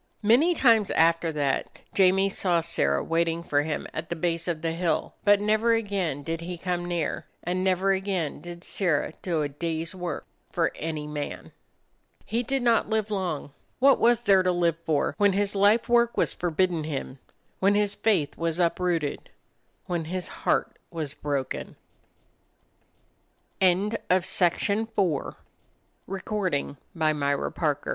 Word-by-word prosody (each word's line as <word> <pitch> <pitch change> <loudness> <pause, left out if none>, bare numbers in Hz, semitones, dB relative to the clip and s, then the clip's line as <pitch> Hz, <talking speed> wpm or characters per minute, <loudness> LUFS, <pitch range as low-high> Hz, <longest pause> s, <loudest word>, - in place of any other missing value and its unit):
Many 270 +12 +4
times 225 -8 +4
after 165 0 +3
that 140 -3 -1 0.2
Jamie 195 0 +4
saw 180 -3 +1
Sirrah 70 - 0
waiting 165 0 0
for 145 -3 +1
him 150 0 -3
at 160 +1 -5
the 170 - -2
base 170 +1 -1
of 165 -2 -3
the 165 - 0
hill, 170 +1 -1
but 205 -1 +5
never 215 +3 +2
again 195 -10 -1
did 165 +1 -3
he 175 +1 -5
come 175 0 -2
near, 170 -4 -2 0.2
and 180 +2 -1
never 190 +1 +2
again 190 -5 -2
did 175 0 -9
Sirrah 165 -5 0
do 165 -4 -1
a - - 0
day's 165 +2 -3
work 180 -2 -5 0.3
for - - +1
any 155 -2 -4
man. 150 -1 -6 0.7
He 230 +2 -1
did 265 +1 -1
not 230 -3 +3
live 220 -1 0
long. 175 -8 -2 0.3
What 275 +2 +5
was 240 0 +3
there 195 -3 +5
to 185 0 +2
live 170 -2 +1
for, 150 -2 +1
when 205 -1 +4
his 200 +1 +1
life 205 +4 +3
work 235 -1 +3
was - - +1
forbidden 175 -1 0
him, 140 -3 -5 0.4
when 200 +2 +3
his 205 -1 +2
faith 195 -9 +1
was 165 0 -1
uprooted, 170 -3 0 0.6
when 170 -2 -2
his 180 +2 -3
heart - - 0
was 155 -4 -5
bro 145 -3 -2
175 Hz, 135 wpm, -26 LUFS, 160-200 Hz, 0.7 s, but